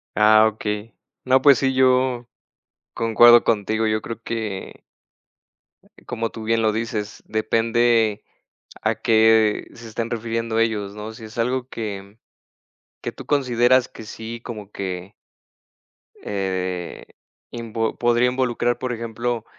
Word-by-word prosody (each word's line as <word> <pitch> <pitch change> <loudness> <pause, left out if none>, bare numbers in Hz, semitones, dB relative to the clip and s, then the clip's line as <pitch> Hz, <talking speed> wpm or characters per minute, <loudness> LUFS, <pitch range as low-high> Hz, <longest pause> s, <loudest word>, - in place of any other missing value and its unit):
Ah, 110 +1 +6
okey. 105 0 -4 0.3
No, 130 +1 +4
pues 140 -3 +6
sí, 135 -1 +1
yo 130 -2 +2 0.7
concuerdo 120 +1 +6
contigo. 110 0 0
Yo 110 0 0
creo 115 +1 -7
que 110 -5 -5 1.0
eh, - - -23
como 115 -2 -3
tú 110 - -8
bien 115 +1 +1
lo 110 -1 +2
dices, 110 -1 -4
depende 115 0 +1 0.6
a - - +1
qué 110 -1 +3
se 115 0 -11
estén 115 +1 -4
refiriendo 115 -1 -2
ellos, 105 -3 -1
¿no? 105 +1 -7
Si 110 - -11
es 110 +3 -12
algo 125 +2 -1
que 100 -1 -7 0.8
que - - -3
tú - - -12
consideras 130 -2 +3
que 110 - -11
sí, 110 +2 -8
como 105 -4 -8
que 95 -1 -6 1.1
eh, 95 -3 -3 0.5
invo 115 -1 -3
podría 120 +1 +3
involucrar, 125 -1 0
por 130 -1 -3
ejemplo, 115 0 -3
115 Hz, 130 wpm, -22 LUFS, 110-120 Hz, 1.1 s, Ah